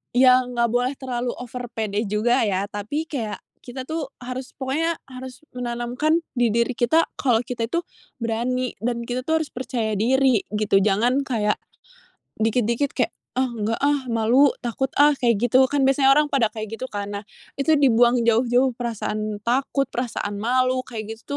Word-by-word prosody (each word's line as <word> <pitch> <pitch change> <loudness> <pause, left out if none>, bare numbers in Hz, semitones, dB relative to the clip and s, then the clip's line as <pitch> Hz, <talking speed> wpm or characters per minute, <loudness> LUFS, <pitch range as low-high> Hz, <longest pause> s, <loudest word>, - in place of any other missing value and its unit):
yang 255 -1 +5
enggak 235 -1 +2
boleh 245 +2 +1
terlalu 250 -2 -3
over 245 0 -6
pede 215 -2 -2
juga 230 +5 +2
ya 195 0 0
tapi 215 +10 -3
kayak 230 -10 -4 0.2
kita 255 +1 -7
tuh 315 -4 -4
harus 255 +1 -6
pokoknya 310 +5 -1
harus 255 -1 -9 0.2
menanamkan 245 +6 0 0.2
di 240 -2 +2
diri 235 +3 +1
kita 315 +9 +3
kalau 245 -5 +2
kita 240 -1 -4
itu 340 - +1 0.4
berani 245 +2 -1
dan 235 0 -1
kita 250 +1 -2
tuh 320 +3 +1
harus 315 - -3
percaya 235 -4 -2
diri 260 +1 +3 0.2
gitu 210 -2 +3
jangan 215 +6 +2
kayak, 210 -4 +1 0.9
dikit 225 +2 +2
dikit 235 +6 0
kayak, - - +1 0.3
"Ah, 260 - +3
nggak, 225 -2 -2
ah, 285 0 +2
malu 235 +5 +4 0.2
takut, 245 +3 -1
ah," 295 +1 +6
kayak 240 -5 +2
gitu 255 +2 +5
kan 285 -2 +2
biasanya 270 0 +4
orang 300 0 +4
pada 240 -5 +3
kayak 220 0 -6
gitu 260 - -5
kan 205 0 -4
nah 200 - -4 0.3
itu 310 +3 +2
dibuang 245 -2 +4
jauh-jauh 245 +2 +3
perasaan 215 -3 -3
takut, 270 +3 +1
perasaan 230 -4 -3
malu 255 +3 +1
kayak 225 -3 -6
gitu 225 - -21
245 Hz, 170 wpm, -23 LUFS, 225-265 Hz, 0.9 s, ah